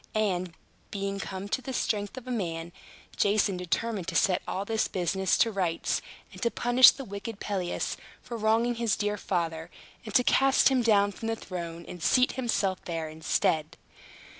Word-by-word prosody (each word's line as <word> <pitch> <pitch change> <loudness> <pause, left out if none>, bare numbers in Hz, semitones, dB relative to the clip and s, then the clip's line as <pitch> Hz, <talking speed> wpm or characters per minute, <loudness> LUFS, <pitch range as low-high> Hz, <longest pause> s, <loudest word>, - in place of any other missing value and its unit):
And, 185 -5 0 0.3
being 195 -1 -3
come 190 0 -5
to 260 - -1
the 265 +1 -6
strength 205 -1 -1
of 260 - -8
a 255 - -5
man, 170 -7 -3 0.5
Jason 205 -1 +2
determined 180 +2 -2
to - - -4
set 185 -1 +3
all 195 +2 -3
this 220 +1 0
business 190 +1 0
to 230 - +3
rights, 180 -5 -1 0.3
and - - -11
to 235 - +2
punish 245 +2 +7
the 270 - -4
wicked 200 +1 -7
Pelias 185 -4 -2 0.2
for 240 - -8
wronging 225 +2 +2
his 230 -3 +2
dear 210 0 -1
father, 165 -4 -2 0.3
and 215 - -7
to 250 - +6
cast 270 +2 +4
him 260 -2 +2
down 205 -3 +4
from 225 +3 -7
the 225 - 0
throne, 170 -5 -7
and 175 - -9
seat 255 +9 +4
himself 200 -7 -1
there 165 -2 -3
instead. 155 0 0
200 Hz, 175 wpm, -28 LUFS, 180-230 Hz, 0.5 s, punish